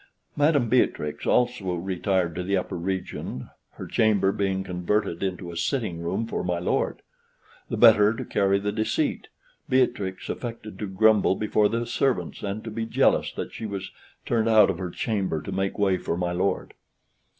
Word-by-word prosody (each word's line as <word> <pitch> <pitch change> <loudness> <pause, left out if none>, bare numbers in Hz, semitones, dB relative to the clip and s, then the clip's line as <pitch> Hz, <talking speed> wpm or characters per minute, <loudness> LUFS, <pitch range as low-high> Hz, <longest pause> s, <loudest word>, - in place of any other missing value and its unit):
Madam 145 -4 +3
Beatrix 110 -10 0
also 120 -7 +1
retired 95 0 -1
to 90 - -3
the 95 +2 0
upper 90 - -3
region, 90 -7 -4 0.2
her - - -8
chamber 105 -3 +2
being 95 -1 -1
converted 90 0 -1
into 90 -2 -3
a - - -9
sitting 85 - -2
room 95 +7 -2
for 115 - -3
my 90 -1 -1
lord. 85 - -1 0.7
The - - -2
better 110 -3 +7
to 115 - -5
carry 100 -1 +2
the 100 +1 -2
deceit, 110 +1 -1 0.4
Beatrix 105 -7 0
affected 115 -3 -6
to 105 - -3
grumble 105 0 +4
before 105 0 +2
the 115 +1 -1
servants, 130 +2 -1
and 100 +2 -4
to 115 - -6
be 115 +1 -3
jealous - - +2
that - - -6
she 110 - -5
was 100 -2 -5 0.3
turned 115 -1 +1
out 105 -3 +6
of 90 - -6
her 90 -1 -3
chamber 95 -5 -1
to 95 - -7
make 95 +1 -2
way 95 -3 +2
for 85 - -2
my 90 -1 -1
lord. 90 +3 -1
100 Hz, 170 wpm, -25 LUFS, 90-110 Hz, 0.7 s, better